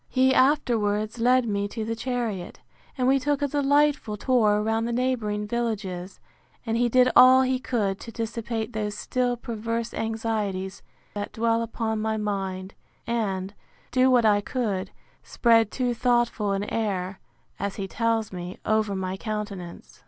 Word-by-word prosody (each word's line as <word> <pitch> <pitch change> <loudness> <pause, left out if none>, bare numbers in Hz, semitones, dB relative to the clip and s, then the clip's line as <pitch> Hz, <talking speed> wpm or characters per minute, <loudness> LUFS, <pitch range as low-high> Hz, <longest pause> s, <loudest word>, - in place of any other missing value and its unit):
He 260 0 +3
afterwards 230 -6 +2
led 250 +1 +3
me 200 -1 -1
to 220 +1 -5
the 225 +1 -2
chariot; 230 -6 -3 0.4
and 255 -1 +1
we 270 +1 +4
took 290 +1 0
a - - +2
delightful 285 -5 +2
tour 215 -3 +3
round 225 +1 0
the - - -2
neighbouring 230 -4 -1
villages; 205 -5 -3 0.5
and 225 -1 -1
he 240 +1 +2
did 255 +1 +4
all 260 +1 +8
he 255 0 0
could 210 -7 -1
to 230 - -9
dissipate 230 0 -4
those 210 -1 -3
still 245 +1 -1
perverse 230 0 -4
anxieties 215 -4 -2 0.3
that 205 0 -5
dwell 230 0 +1
upon 225 -1 -2
my 220 0 -1
mind, 195 -2 -3 0.3
and, 200 -5 -2 0.4
do 255 0 +4
what 245 -3 +4
I 205 -1 +4
can, 205 -5 -2 0.3
spread 225 -3 +3
too 250 0 -1
thoughtful 240 -3 +1
an 195 +1 -1
air, 195 -4 -2 0.4
as 200 0 -3
he 195 - -4
tells 225 0 -1
me, 180 0 -6
over 215 -2 +1
my 190 0 -3
countenance. 205 -5 -6
225 Hz, 150 wpm, -25 LUFS, 205-245 Hz, 0.5 s, all